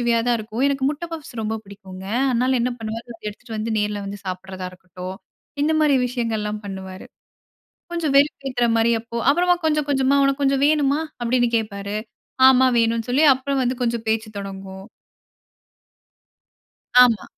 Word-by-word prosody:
நகைச்சுவையா 235 -1 +2
தான் 240 - +3
இருக்கும். 220 +3 -4
எனக்கு 275 -1 -1
முட்ட 300 +3 -4
பப்ஸ் 305 -5 -7
ரொம்ப 220 0 -2
பிடிக்குங்க. 190 -2 -11 0.3
அதனால 255 +2 +2
என்ன 250 +1 +1
பண்ணுவாரு? 225 +1 -5 0.2
எடுத்துட்டு 225 +3 -11
வந்து 220 +1 -3
நேர்ல 210 0 -1
வந்து 200 +1 -6
சாப்பிடுறதா 185 0 -5
இருக்கட்டும். 185 +1 -9 0.5
இந்த 315 +2 +2
மாரி 300 -2 +4
விஷயங்கள்லாம் 220 -4 -2
பண்ணுவாரு. 190 -1 -7 0.9
கொஞ்சம் 315 -5 -1
வெறுப்பேத்துற 270 -4 +2
மாரி, 230 +1 +3
அப்போ 230 +1 -8
அப்புறமா 355 +3 +3
கொஞ்சம் 300 -2 +1
கொஞ்சமா 275 0 +2
"உனக்கு 275 +1 +1
கொஞ்சம் 275 0 +2
வேணுமா?" 295 -1 +2 0.2
அப்பிடீன்னு 240 0 +2
கேப்பாரு. 205 -2 -3 0.5
"ஆமா, 260 0 +5
வேணும்னு" 230 +1 +1
சொல்லி, 290 +5 +3
அப்புறம் 270 +1 -2
வந்து 250 +1 -1
கொஞ்சம் 235 -1 -1
பேச்சு 220 0 0
தொடங்கும். 195 -1 -8 2.2
ஆமா. 230 -5 +2
235 Hz, 145 wpm, -22 LUFS, 210-270 Hz, 2.2 s, ஆமா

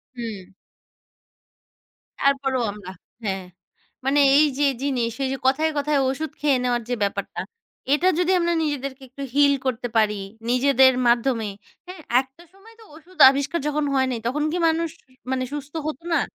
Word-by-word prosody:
হুম। 215 -6 -7 1.7
তারপরও 270 -2 +1
আমরা 200 -2 -10 0.3
হ্যাঁ। 195 -2 -2 0.6
মানে 275 +2 +3 0.2
এই 305 - +6
যে 290 - +1
এই - - -7
জিনিস, 250 -5 0
এই 265 - 0
যে 270 - -3
কথায়, 310 +4 +2
কথায় 290 0 +1
ওষুধ 305 +4 -3
খেয়ে 290 -3 +2
নেওয়ার 245 -1 0
যে 245 - 0
ব্যাপারটা, 200 - -3 0.5
এটা 320 +5 +2
যদি 360 +1 +2
আমরা 345 0 +1
নিজেদেরকে 275 -2 -3
একটু 275 +3 -8
হিল 285 -1 +5
করতে 245 -1 -1
পারি, 210 -2 +2 0.3
নিজেদের 260 +1 +5
মাধ্যমে। 235 -2 +1 0.4
হ্যাঁ, 365 -2 -9 0.2
একটা 265 +6 -18
সময় 430 +4 -18
তো - - -14
ওষুধ 340 +3 -18
আবিষ্কার 280 +5 -1
যখন 300 0 0
হয় 265 -1 +2
নাই, 240 - -3
তখন 295 +5 -1
কি 350 - -1
মানুষ 330 +1 0 0.4
মানে 260 -1 0
সুস্থ 290 0 -6
হত 300 -3 -4
না? - - +3
275 Hz, 160 wpm, -23 LUFS, 245-300 Hz, 1.7 s, এই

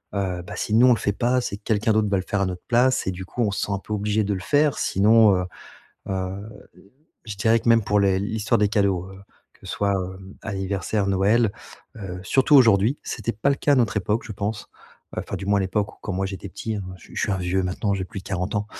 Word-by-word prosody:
heu, 95 -3 -2
bah, - - -8
si 105 - -3
nous 120 +3 +6
on 125 - +7
le - - -1
fait 100 - 0
pas, 125 +3 +1
c'est 100 - -4
que 105 - -28
quelqu'un 110 0 +1
d'autre 110 -1 +2
va 100 - +2
le 95 - -2
faire 105 - -1
à - - +2
notre 90 -1 -4
place, 125 +2 +3
et - - +1
du 95 +1 -7
coup 120 - -4
on 105 - +1
se - - -3
sent 100 - -2
un 95 - -1
peu 105 - -13
obligé 105 +1 0
de 100 0 -1
le 95 - -3
faire 145 +7 +2
sinon, 105 0 +5
heu 90 0 -1 0.6
heu, 95 +1 -3 0.8
je 105 -2 -6
dirais 115 +2 +3
que 115 - -1
même 115 -2 +5
pour 105 0 +2
les 95 -1 +3
l'histoire 105 +1 0
des 105 0 +3
cadeaux, 100 -4 +1
heu, 95 - -12 0.3
que - - -15
ce - - -5
soit, 100 -1 0
heu, 95 0 -4 0.3
anniversaire, 100 +1 -2
Noël, 100 +3 +3 0.5
heu, 90 -3 -6
surtout 135 +8 +3
aujourd'hui. 115 +1 +5
C'était 115 - -3
pas 110 +7 0
le 140 - +2
cas 145 - +2
à - - +5
notre 115 -4 +2
époque 105 +3 -1
je 110 - -7
pense, 105 +1 -4 0.5
heu, - - -2
enfin, - - -5
du 95 - -6
moins 100 0 +2
à - - +1
l'époque 100 +2 -1
où - - -27
quand 100 - -4
moi 95 +1 -1
j'étais 95 0 -6
petit, 110 +2 -4
heu, - - -4 0.2
je - - -23
suis - - -15
je - - -1
suis 105 - 0
un 95 - 0
vieux 90 +1 0
maintenant, 100 +2 -1
j'ai 95 -1 -2
plus 95 - -7
de - - -28
40 95 +1 -3
ans, 105 0 0
100 Hz, 270 wpm, -23 LUFS, 95-110 Hz, 0.8 s, on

